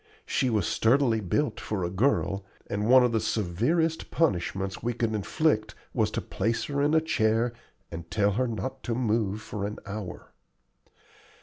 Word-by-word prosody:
She 130 - +1
was 105 -6 +1
sturdily 115 +2 +3
built 135 +10 0
for 100 -4 -3
a 85 - -1
girl, 100 -2 +1 0.2
and 105 +2 -2
one 130 0 +8
of 125 - +2
the 115 - +2
severest 120 - 0
punishments 95 - 0
we 120 +1 -1
could 115 -1 -1
inflict 110 - 0 0.2
was - - +2
to - - -3
place 115 +3 -1
her 140 -1 -1
in 150 +2 +3
a 160 - +5
chair 115 -6 +1 0.4
and 85 0 -7
tell 105 0 +2
her 125 +5 0
not 115 +4 -4
to 115 - -1
move 110 -3 0
for 105 - -5
an 105 +1 -3
hour. 105 -3 -7
110 Hz, 170 wpm, -27 LUFS, 100-130 Hz, 0.4 s, one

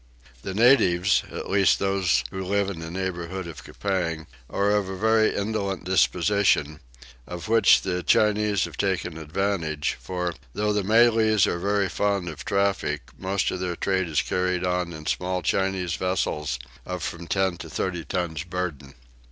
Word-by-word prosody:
The 95 +4 -5
natives, 100 -6 +4
at - - -6
least 95 -1 +3
those 95 -2 +1
who 95 0 -4
live 100 +1 0
in 85 - -7
the 80 0 -6
neighbourhood 95 0 -4
of 85 -3 -9
Coupang, 85 -5 -2 0.2
are 100 +1 +1
of 105 -2 +1
a 95 - -5
very 110 +2 +3
indolent 100 -3 -2
disposition, 90 -2 +2 0.5
of 90 +2 -7
which 115 -2 +5
the 90 -1 -1
Chinese 105 0 +2
have - - -6
taken 95 -4 -1
advantage, 80 -2 -1
for, 90 -1 -3 0.2
though 105 0 +1
the 105 -1 0
Malays 110 -1 +4
are 85 - -1
very 100 +1 +1
fond 100 -1 -1
of 80 - -8
traffic, 100 -7 -1
most 95 +1 -1
of 90 - -4
their 90 -1 -2
trade 95 -2 0
is 75 -4 +1
carried 90 -1 -1
on 90 -1 -1
in 80 -2 -9
small 90 +1 -1
Chinese 95 -1 0
vessels 75 -7 -1 0.3
of 90 -1 -5
from 85 0 -5
10 95 -2 0
to - - -9
30 90 -3 -3
tons 80 -4 -2
burden. 85 -7 -5
95 Hz, 160 wpm, -25 LUFS, 85-100 Hz, 0.5 s, which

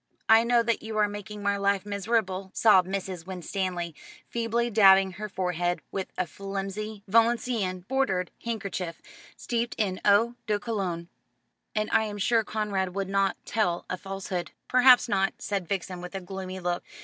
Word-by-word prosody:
"I 225 +1 +7
know 235 0 +3
that 230 0 0
you 220 0 -5
are 210 -1 +4
making 205 0 -7
my 200 0 +1
life 200 0 +1
miserable," 200 -2 -1
sobbed 190 -5 +5
Mrs. 190 -3 -4
Winstanley, 180 -2 -3 0.3
feebly 235 +1 -1
dabbing 195 -2 +6
her 210 +4 -6
forehead 175 -2 -1
with 190 -1 -4
a 185 - +1
flimsy 200 +3 -5
Valenciennes 225 -4 +2
bordered 195 -6 0
handkerchief, 195 -7 -4 0.4
steeped 235 0 -2
in 190 -4 -1
eau 210 +4 +4
de 210 -1 +2
cologne, 190 -7 -3 0.7
"and 215 0 +1
I 220 0 +3
am 205 -1 -5
sure 225 +2 +2
Conrad 200 -4 -2
would 195 -1 -2
not 195 0 +1
tell 180 -6 0
a - - 0
falsehood." 190 -1 -4 0.2
"Perhaps 255 0 +6
not," 195 -3 +1
said 195 -4 -3
Vixen 185 -1 -3
with 180 +2 -8
a - - -2
gloomy 190 0 -6
look. 175 -1 -2
195 Hz, 160 wpm, -27 LUFS, 185-220 Hz, 0.7 s, I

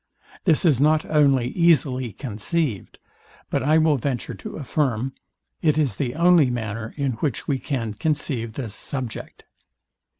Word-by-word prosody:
This 165 -1 +3
is 140 -6 +4
not 155 +1 +3
only 140 -5 +3
easily 140 -7 +2
conceived, 115 - -3 0.5
but - - +1
I 150 +5 +3
will 155 -2 +3
venture 130 -2 -3
to 95 - -8
affirm 135 -4 -1 0.5
it 155 -2 +2
is 135 -10 +1
the 125 -1 -2
only 170 -4 +5
manner, 115 -2 -4
in 140 -2 0
which 145 -6 -2
we 140 -3 0
can 120 -7 -3
conceive 125 -3 -1
this 115 -5 -5
subject. 125 0 -5
135 Hz, 140 wpm, -23 LUFS, 115-155 Hz, 0.5 s, only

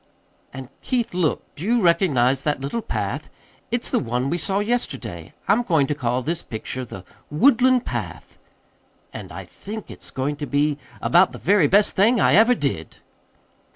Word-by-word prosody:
"And, 130 -1 -9
Keith, 240 -5 -1
look 175 -4 0
do 150 - -8
you 235 +4 +2
recognize 145 - +3
that 145 -1 -1
little 140 +13 -3
path? 225 - -4 0.4
It's 240 0 -1
the - - +2
one 125 +2 -2
we 175 - -1
saw 190 +4 -2
yesterday. 155 - -3
I'm 210 +4 +4
going 165 - +2
to 150 - -1
call 125 -2 -1
this 165 +4 -2
picture 125 +3 -6
'The 95 -6 -9 0.2
Woodland 255 - +4
Path' - - -6 0.7
and - - -8
I - - -8
think 215 +1 -8
it's - - -10
going 140 +2 -3
to 145 - -5
be 145 +1 +1 0.2
about - - +4
the - - -7
very 190 -4 +3
best 200 +6 +3
thing 225 +5 +4
I - - +4
ever 230 +5 +6
did." 130 - -3
155 Hz, 170 wpm, -22 LUFS, 135-215 Hz, 0.7 s, ever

